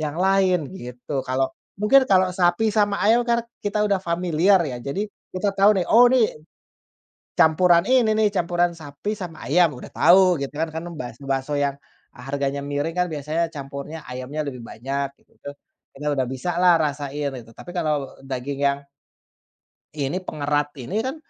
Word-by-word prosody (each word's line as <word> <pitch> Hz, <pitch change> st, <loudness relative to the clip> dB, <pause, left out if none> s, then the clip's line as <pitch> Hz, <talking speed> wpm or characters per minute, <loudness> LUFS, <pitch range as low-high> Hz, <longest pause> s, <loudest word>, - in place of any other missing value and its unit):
yang 150 Hz, 0 st, -3 dB
lain 185 Hz, -5 st, +2 dB
gitu. 125 Hz, 0 st, -5 dB
Kalau 130 Hz, +1 st, 0 dB, 0.3 s
mungkin 260 Hz, +6 st, +5 dB
kalau 185 Hz, -1 st, +4 dB
sapi 180 Hz, +4 st, +2 dB
sama 205 Hz, -2 st, +2 dB
ayam 225 Hz, +3 st, +5 dB
kan 235 Hz, 0 st, +2 dB, 0.2 s
kita 205 Hz, +1 st, 0 dB
udah 200 Hz, -2 st, +1 dB
familiar 175 Hz, +2 st, +2 dB
ya 130 Hz, -4 st, -4 dB
jadi 140 Hz, -, -3 dB, 0.3 s
kita 185 Hz, +3 st, -1 dB
tahu 200 Hz, +1 st, +6 dB
nih, -, -, 0 dB
"Oh, 245 Hz, +2 st, +7 dB
nih 250 Hz, -4 st, +3 dB, 1.1 s
campuran 170 Hz, +2 st, +5 dB
ini 245 Hz, -4 st, +4 dB
nih, 215 Hz, -1 st, +3 dB
campuran 175 Hz, -1 st, +1 dB
sapi 150 Hz, +6 st, -5 dB
sama 175 Hz, -5 st, -8 dB
ayam," 170 Hz, +1 st, +4 dB
udah -, -, -10 dB
tahu 180 Hz, +1 st, +5 dB
gitu 140 Hz, 0 st, -4 dB
kan, 160 Hz, +1 st, -1 dB
karena 165 Hz, +2 st, -5 dB
kan 165 Hz, -, -9 dB
bas 120 Hz, -2 st, -6 dB
bakso 135 Hz, +1 st, -2 dB
yang, 140 Hz, -1 st, +1 dB, 0.4 s
eee, 125 Hz, -, -12 dB
harganya 140 Hz, 0 st, -2 dB
miring 145 Hz, +3 st, -2 dB
kan 180 Hz, 0 st, +2 dB
biasanya 155 Hz, +3 st, -1 dB
campurnya 140 Hz, +2 st, -7 dB
ayamnya 130 Hz, +4 st, -4 dB
lebih 125 Hz, -3 st, -6 dB
banyak 135 Hz, +5 st, -3 dB
gitu -, -, -31 dB
tuh. 145 Hz, -, -7 dB, 0.4 s
Ini 145 Hz, -, -8 dB
sudah 135 Hz, -2 st, 0 dB
bisalah 175 Hz, +7 st, +2 dB
rasain 145 Hz, -1 st, -2 dB
itu, 115 Hz, -, -14 dB
tapi 175 Hz, -, -11 dB
kalau 150 Hz, -5 st, -1 dB
daging 135 Hz, +1 st, -4 dB
yang 140 Hz, 0 st, 0 dB, 1.2 s
ini 150 Hz, +6 st, -2 dB
pengerat 145 Hz, -2 st, -1 dB
ini 195 Hz, -, -2 dB
kan, 260 Hz, +3 st, -3 dB
160 Hz, 170 wpm, -23 LUFS, 140-185 Hz, 1.2 s, Oh